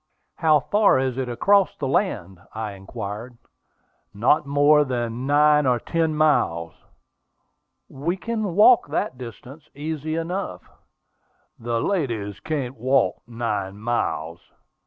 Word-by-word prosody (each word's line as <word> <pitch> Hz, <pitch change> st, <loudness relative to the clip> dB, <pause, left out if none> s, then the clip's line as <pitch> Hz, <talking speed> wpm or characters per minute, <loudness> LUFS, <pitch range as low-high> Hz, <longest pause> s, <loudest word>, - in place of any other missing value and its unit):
"How 155 Hz, -3 st, +4 dB
far 205 Hz, +6 st, +3 dB
is 130 Hz, -1 st, -1 dB
it 130 Hz, -2 st, -2 dB
across 195 Hz, +11 st, +3 dB
the 135 Hz, -, -3 dB
land?" 100 Hz, -, -1 dB, 0.2 s
I 110 Hz, -1 st, -4 dB
inquired. 100 Hz, +4 st, -7 dB, 0.8 s
"Not 135 Hz, +8 st, +2 dB
more 145 Hz, +1 st, +4 dB
than 120 Hz, -1 st, -3 dB
nine 150 Hz, 0 st, +4 dB
or 125 Hz, -1 st, +2 dB
ten 160 Hz, +3 st, -1 dB
miles." 85 Hz, -, +1 dB, 1.1 s
"We 165 Hz, +7 st, -3 dB
can 215 Hz, -4 st, -3 dB
walk 215 Hz, +1 st, +6 dB
that 145 Hz, -3 st, -3 dB
distance 130 Hz, +5 st, -11 dB
easy 155 Hz, +1 st, -4 dB
enough." 175 Hz, +4 st, -4 dB, 1.0 s
"The 115 Hz, 0 st, -2 dB
ladies 115 Hz, -, -2 dB
can't 135 Hz, -5 st, -4 dB
walk 130 Hz, +4 st, +1 dB
nine 105 Hz, -5 st, -3 dB
miles." 85 Hz, -8 st, -2 dB
135 Hz, 115 wpm, -23 LUFS, 115-155 Hz, 1.1 s, walk